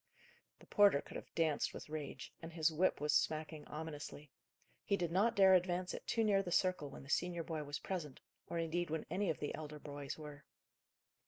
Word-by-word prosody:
The -, -, -17 dB
porter 200 Hz, -8 st, +6 dB
could -, -, -10 dB
have -, -, -7 dB
danced 160 Hz, -3 st, +1 dB
with -, -, -7 dB
rage; 150 Hz, -2 st, -6 dB
and 165 Hz, 0 st, -7 dB
his 160 Hz, -1 st, +2 dB
whip 180 Hz, +4 st, +2 dB
was 150 Hz, +1 st, +1 dB
smacking 155 Hz, -1 st, 0 dB
ominously. 150 Hz, -2 st, -6 dB, 0.5 s
He 200 Hz, -, +1 dB
did 175 Hz, -3 st, -1 dB
not 215 Hz, +6 st, +3 dB
dare 190 Hz, -1 st, +7 dB
advance 180 Hz, 0 st, +2 dB
it -, -, -7 dB
too 230 Hz, -, +2 dB
near 200 Hz, -2 st, +4 dB
the 180 Hz, -2 st, -5 dB
circle 180 Hz, -5 st, +2 dB
when 140 Hz, -, -10 dB
the 135 Hz, -, -13 dB
senior 175 Hz, -1 st, +1 dB
boy 160 Hz, -2 st, -3 dB
was 145 Hz, +1 st, -3 dB
present, 165 Hz, -8 st, -4 dB, 0.3 s
or 170 Hz, -, -2 dB
indeed, 165 Hz, +1 st, 0 dB
when 160 Hz, 0 st, -2 dB
any 200 Hz, +1 st, +1 dB
of 155 Hz, -, 0 dB
the 145 Hz, -, -3 dB
elder 150 Hz, -1 st, -6 dB
boys 145 Hz, -2 st, -6 dB
were. 150 Hz, -2 st, -9 dB
160 Hz, 200 wpm, -37 LUFS, 150-180 Hz, 0.5 s, dare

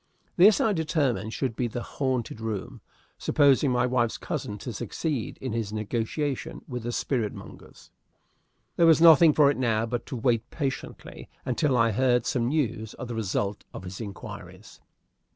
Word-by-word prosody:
This, 195 Hz, +4 st, +6 dB
I 215 Hz, -, +2 dB
determined, 150 Hz, -, 0 dB
should 125 Hz, -1 st, -2 dB
be 125 Hz, -, -1 dB
the 120 Hz, +1 st, -5 dB
haunted 130 Hz, -5 st, -3 dB
room, 110 Hz, -3 st, -5 dB, 0.4 s
supposing 140 Hz, -1 st, +3 dB
my 125 Hz, -1 st, +2 dB
wife's 120 Hz, -2 st, 0 dB
cousin 105 Hz, -, -4 dB
to 115 Hz, +3 st, -6 dB
succeed 140 Hz, +3 st, -3 dB
in 130 Hz, -4 st, -4 dB
his 115 Hz, -3 st, -2 dB
negotiation 115 Hz, +6 st, -3 dB
with 125 Hz, -3 st, -5 dB
the 120 Hz, +2 st, -4 dB
spirit 120 Hz, -3 st, -1 dB
mongers. -, -, -13 dB, 0.9 s
There 170 Hz, -, +5 dB
was 160 Hz, -1 st, +6 dB
nothing 165 Hz, -1 st, +8 dB
for 145 Hz, -1 st, +5 dB
it -, -, -4 dB
now 115 Hz, -3 st, +1 dB
but 120 Hz, +1 st, -4 dB
to 135 Hz, -, -5 dB
wait 120 Hz, -1 st, 0 dB
patiently 140 Hz, -4 st, -5 dB, 0.2 s
until 130 Hz, +1 st, +1 dB
I 115 Hz, -1 st, +3 dB
heard 125 Hz, +1 st, +2 dB
some 120 Hz, -2 st, 0 dB
news 115 Hz, -7 st, -1 dB
of 130 Hz, -, -7 dB
the -, -, -3 dB
result 105 Hz, -2 st, -2 dB
of -, -, -7 dB
his 95 Hz, +4 st, -7 dB
inquiries. 100 Hz, -4 st, -9 dB
125 Hz, 165 wpm, -26 LUFS, 110-140 Hz, 0.9 s, nothing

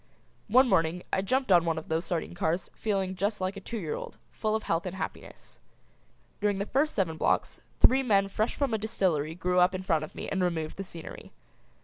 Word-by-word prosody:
One 255 Hz, +5 st, +6 dB
morning 165 Hz, -3 st, +2 dB
I 190 Hz, -, +3 dB
jumped 255 Hz, +3 st, 0 dB
on 175 Hz, -2 st, +7 dB
one 165 Hz, -1 st, 0 dB
of 160 Hz, -, -6 dB
those 160 Hz, +2 st, -1 dB
sardine 170 Hz, -1 st, -2 dB
cars 175 Hz, +1 st, -1 dB
feeling 195 Hz, -3 st, -1 dB
just 205 Hz, +3 st, -1 dB
like 185 Hz, +1 st, -2 dB
a -, -, -6 dB
two 230 Hz, +4 st, -6 dB
year 165 Hz, -8 st, -3 dB
old, -, -, -7 dB
full 215 Hz, -1 st, -1 dB
of 220 Hz, -, -2 dB
health 165 Hz, +2 st, -1 dB
and 180 Hz, -, -5 dB
happiness. 190 Hz, -, -7 dB, 0.8 s
During 205 Hz, -1 st, +1 dB
the 200 Hz, -, -1 dB
first 285 Hz, +7 st, +1 dB
seven 165 Hz, -6 st, 0 dB
blocks -, -, 0 dB, 0.2 s
three 265 Hz, +1 st, +6 dB
men 200 Hz, -6 st, +3 dB
fresh 215 Hz, +3 st, -1 dB
from 275 Hz, -5 st, 0 dB
a 220 Hz, -, +1 dB
distillery 175 Hz, -8 st, 0 dB
grew 180 Hz, +1 st, +1 dB
up 180 Hz, +1 st, +4 dB
in 185 Hz, -, -4 dB
front 160 Hz, -4 st, +1 dB
of 155 Hz, -, -9 dB
me -, -, -5 dB
and 190 Hz, -, -1 dB
removed 160 Hz, -3 st, -2 dB
the 195 Hz, -, -3 dB
scenery. 170 Hz, -3 st, -10 dB
190 Hz, 220 wpm, -29 LUFS, 170-215 Hz, 0.8 s, on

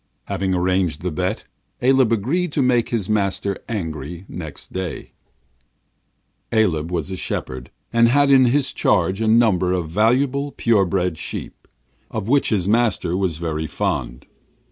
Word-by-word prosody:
Having 95 Hz, -1 st, -1 dB
arranged 90 Hz, -3 st, 0 dB
this 90 Hz, -, -1 dB
bet, 75 Hz, -, -2 dB, 0.4 s
Aleb 130 Hz, -2 st, +3 dB
agreed 145 Hz, -, 0 dB
to 140 Hz, -, +2 dB
make 120 Hz, -2 st, +2 dB
his 110 Hz, -6 st, -2 dB
master 100 Hz, -2 st, 0 dB
angry 85 Hz, -4 st, -5 dB
next 80 Hz, -5 st, -9 dB
morning. 95 Hz, -3 st, -5 dB, 1.4 s
Aleb 85 Hz, -8 st, +1 dB
was 85 Hz, -2 st, -2 dB
a -, -, -3 dB
shepherd, 65 Hz, -7 st, -5 dB, 0.2 s
and 115 Hz, 0 st, +5 dB
had 145 Hz, +2 st, +4 dB
in 130 Hz, -1 st, +6 dB
his 135 Hz, +3 st, +2 dB
charge 95 Hz, +3 st, +1 dB
a 110 Hz, -, +1 dB
number 110 Hz, -6 st, +3 dB
of 85 Hz, -3 st, -2 dB
valuable, 130 Hz, +8 st, +1 dB
pure 110 Hz, -5 st, +2 dB
bred 90 Hz, -3 st, -1 dB
sheep, 75 Hz, -, -7 dB, 0.4 s
of 110 Hz, -2 st, -4 dB
which 140 Hz, +3 st, +3 dB
his 100 Hz, -5 st, 0 dB
master 110 Hz, -5 st, +1 dB
was 90 Hz, -4 st, -1 dB
very 80 Hz, -1 st, -3 dB
fond. -, -, -3 dB
100 Hz, 145 wpm, -21 LUFS, 85-120 Hz, 1.4 s, in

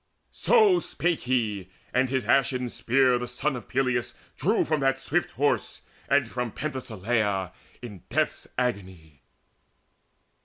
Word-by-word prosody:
So 425 Hz, -7 st, +4 dB
spake 175 Hz, -, -1 dB
he, 105 Hz, -7 st, 0 dB, 0.2 s
and 125 Hz, +1 st, +2 dB
his 130 Hz, -1 st, -1 dB
ashen 125 Hz, -2 st, +2 dB
spear 125 Hz, +2 st, +2 dB
the 125 Hz, -, -4 dB
son 130 Hz, +4 st, -1 dB
Of 125 Hz, -, -8 dB
Peleus 125 Hz, -2 st, 0 dB, 0.2 s
drew 205 Hz, -, +1 dB
from 155 Hz, -1 st, 0 dB
that 135 Hz, -1 st, +2 dB
swift 155 Hz, +6 st, -1 dB
horse, 145 Hz, +2 st, 0 dB, 0.3 s
and 145 Hz, -4 st, +3 dB
from 125 Hz, -1 st, -4 dB
Penthesileia 110 Hz, -8 st, -2 dB, 0.3 s
in 105 Hz, -7 st, -8 dB
death's -, -, -1 dB
agony. 95 Hz, -, -3 dB
125 Hz, 125 wpm, -26 LUFS, 115-135 Hz, 0.3 s, So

